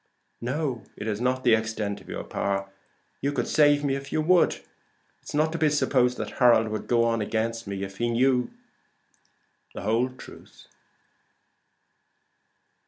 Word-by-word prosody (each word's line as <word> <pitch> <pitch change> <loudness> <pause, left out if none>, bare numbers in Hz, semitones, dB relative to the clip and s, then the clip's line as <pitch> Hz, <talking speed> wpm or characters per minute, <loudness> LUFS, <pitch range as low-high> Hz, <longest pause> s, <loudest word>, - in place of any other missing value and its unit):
"No, 130 -1 -2 0.2
it 105 - -6
is 110 0 -2
not 130 +1 0
the 120 - +5
extent 110 -2 -1
of - - -17
your - - -5
power. 100 0 -2 0.5
You 140 - 0
could 125 -4 -2
save 145 -1 +4
me 140 -2 +1
if 140 0 -7
you - - 0
would. 175 +3 +4
It - - -13 0.7
is - - -5
not 155 +1 +2
to 165 - -4
be 155 - +4
supposed 125 -4 +2
that 110 -1 -6
Harold 120 -3 +5
would 110 0 -4
go 120 -1 +3
on 115 -1 +1
against 115 +1 -2
me 100 -1 -4
if 95 0 -7
he 120 0 0
knew 125 +1 +2 1.3
the - - -6
whole 115 +5 +1
truth." 130 0 -14
120 Hz, 165 wpm, -26 LUFS, 110-140 Hz, 1.3 s, the